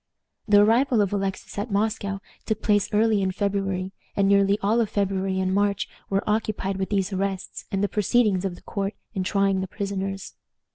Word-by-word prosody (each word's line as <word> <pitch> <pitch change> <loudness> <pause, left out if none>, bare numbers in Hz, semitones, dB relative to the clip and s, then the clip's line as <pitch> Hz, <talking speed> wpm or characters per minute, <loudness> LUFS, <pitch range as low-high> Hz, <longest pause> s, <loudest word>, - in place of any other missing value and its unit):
The 205 -1 +7
arrival 235 +3 +3
of 205 -1 +1
Alexis 195 0 -3
at 210 +4 -3
Moscow 200 -1 -1 0.3
took 220 0 -1
place 205 -2 +2
early 215 -1 +3
in 190 - +1
February, 195 -1 -1 0.2
and 200 -1 +3
nearly 200 0 +4
all 220 +4 +3
of 220 - 0
February 195 -1 0
and 185 0 0
March 200 0 +1 0.2
were 195 0 0
occupied 210 -2 -1
with 190 0 -2
these 195 -1 0
arrests 190 0 -3
and 195 0 0
the - - +3
proceedings 210 -2 +2
of 190 -3 -2
the - - -16
court 200 0 -3 0.2
in 190 - -1
trying 195 0 +1
the 190 - -3
prisoners. 195 -1 -4
200 Hz, 185 wpm, -25 LUFS, 195-210 Hz, 0.3 s, The